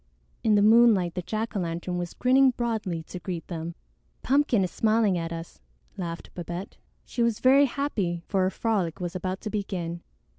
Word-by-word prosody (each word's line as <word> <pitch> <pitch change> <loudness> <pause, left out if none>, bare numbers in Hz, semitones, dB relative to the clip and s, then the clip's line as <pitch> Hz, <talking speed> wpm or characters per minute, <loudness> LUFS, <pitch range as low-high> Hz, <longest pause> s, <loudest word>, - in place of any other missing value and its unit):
In 215 -1 +4
the 205 - +4
moonlight 215 -5 +5
the 180 - -3
jack 220 +5 -3
o' - - +1
lantern 170 +1 -3
was 175 -1 -5
grinning 265 +2 +5
broadly 215 -8 -2
to 180 - -8
greet 175 -3 -5
them. 165 -1 -5 0.5
"Pumpkin 265 -6 +3
is 180 - -2
smiling 220 -3 +2
at 165 -1 -3
us," 165 0 -7 0.4
laughed 170 -2 -6
Babette. 175 +2 -6 0.3
She 240 - -3
was 235 -2 +2
very 275 +2 +6
happy, 210 -12 -2
for 195 -2 +1
her 185 - +3
frolic 195 -6 -1
was 180 0 -4
about 185 +1 -3
to 215 - -5
begin. 175 -5 -3
190 Hz, 180 wpm, -26 LUFS, 175-225 Hz, 0.5 s, very